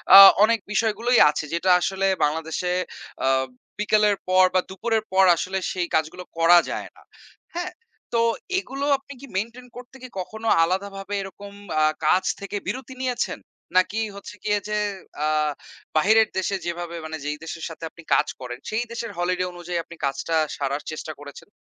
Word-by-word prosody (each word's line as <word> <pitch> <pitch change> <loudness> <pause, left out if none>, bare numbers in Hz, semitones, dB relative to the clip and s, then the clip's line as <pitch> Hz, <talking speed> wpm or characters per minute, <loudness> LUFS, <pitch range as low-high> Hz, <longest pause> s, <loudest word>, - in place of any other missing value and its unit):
আ - - +14 0.3
অনেক 230 +1 +4
বিষয়গুলোই 225 +3 +2
আছে 150 - -2
যেটা 170 +2 +1
আসলে 195 +1 0 0.2
বাংলাদেশে 160 +4 -1 0.5
আ - - +3 0.5
বিকেলের 210 -1 +3
পর 185 0 +6
বা 185 - +5
দুপুরের 220 +3 -1
পর 190 0 +6
আসলে 185 +3 -2
সেই 180 -2 -1
কাজগুলো 160 +3 -1
করা 165 +1 +7
যায় - - -4
না। - - -19 0.6
হ্যাঁ? 355 +1 -3 0.4
তো 230 - +3 0.4
এগুলো 275 -5 -4
আপনি 275 +1 -12
কি - - -8
মেইনটেইন 235 +5 -4
করতে 250 +1 -11
কি - - -6
কখনো 220 +5 -5 0.2
আলাদাভাবে 195 +3 -2
এরকম 200 +1 -9 0.3
আ - - +5 0.2
কাজ 180 +4 +4 0.2
থেকে 200 +1 -4
বিরতি 260 0 -4
নিয়েছেন? 250 -2 -1 0.4
নাকি 195 +4 +2 0.2
হচ্ছে 200 +1 -9
গিয়ে 210 -1 +1
যে, 210 - 0 0.5
আ - - +2 0.7
বাহিরের 220 +6 +5
দেশে 190 +1 0
যেভাবে 170 0 -4
মানে 160 0 -5
যেই 150 0 -2
দেশের 165 0 -6
সাথে 165 0 -10
আপনি 170 - -15
কাজ - - +4
করেন 125 -1 -6
সেই 220 +2 0
দেশের 235 -1 -4
হলিডে 180 +1 0
অনুযায়ী 175 0 -4
আপনি 170 - -12
কাজটা 140 +4 -1 0.2
সারার 140 +1 -2
চেষ্টা 155 0 -5
করেছেন? 145 -1 -11
190 Hz, 165 wpm, -24 LUFS, 170-220 Hz, 0.7 s, আ